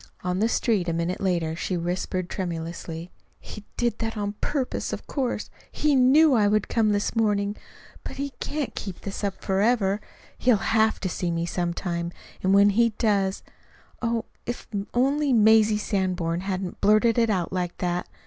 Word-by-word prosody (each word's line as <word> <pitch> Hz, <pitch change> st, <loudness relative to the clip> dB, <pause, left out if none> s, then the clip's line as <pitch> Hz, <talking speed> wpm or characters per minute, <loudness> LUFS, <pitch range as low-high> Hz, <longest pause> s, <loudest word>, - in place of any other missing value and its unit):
On 180 Hz, 0 st, -1 dB
the 220 Hz, +2 st, +2 dB
street 210 Hz, -8 st, +1 dB
a -, -, 0 dB
minute 170 Hz, +2 st, -2 dB
later 170 Hz, -4 st, 0 dB
she 180 Hz, +2 st, -2 dB
whispered 180 Hz, +1 st, -2 dB
tremulously: 170 Hz, -1 st, -5 dB, 0.3 s
"He 210 Hz, -, -10 dB
did 240 Hz, -1 st, 0 dB
it 225 Hz, 0 st, -2 dB
on 205 Hz, -1 st, -2 dB
purpose, 275 Hz, -4 st, -2 dB
of -, -, -5 dB
course. 260 Hz, -4 st, -2 dB, 0.2 s
He 300 Hz, -1 st, +1 dB
KNEW 275 Hz, +4 st, +6 dB
I 215 Hz, -4 st, +4 dB
would 210 Hz, 0 st, +2 dB
come 225 Hz, -2 st, +2 dB
this 205 Hz, +2 st, 0 dB
morning! 205 Hz, -2 st, +1 dB, 0.5 s
But -, -, -7 dB
he 280 Hz, 0 st, -3 dB
can't 290 Hz, -6 st, -3 dB
keep 195 Hz, -4 st, -7 dB
it 200 Hz, +1 st, -5 dB
up 200 Hz, -2 st, -3 dB
forever! 200 Hz, 0 st, +2 dB, 0.4 s
He'll 245 Hz, -3 st, +4 dB
HAVE 220 Hz, +1 st, +2 dB
to 190 Hz, -, -1 dB
see 180 Hz, 0 st, -2 dB
me 170 Hz, 0 st, -1 dB
some 175 Hz, 0 st, -2 dB
time. 170 Hz, -2 st, -3 dB, 0.3 s
And 190 Hz, -, +2 dB
when 200 Hz, +1 st, +6 dB
he 230 Hz, +2 st, +3 dB
does 200 Hz, -4 st, +1 dB, 0.6 s
Oh, 230 Hz, -1 st, -1 dB, 0.2 s
if 240 Hz, -, -5 dB, 0.3 s
only 275 Hz, +3 st, +2 dB
Mazie 220 Hz, -1 st, +5 dB
Sanborn 185 Hz, -5 st, -1 dB
hadn't 190 Hz, -1 st, -4 dB
blurted 215 Hz, +3 st, +4 dB
it 230 Hz, -1 st, +3 dB
out 185 Hz, -5 st, -1 dB
like 180 Hz, -1 st, -2 dB
that! 175 Hz, -1 st, -2 dB
205 Hz, 170 wpm, -25 LUFS, 180-230 Hz, 0.6 s, KNEW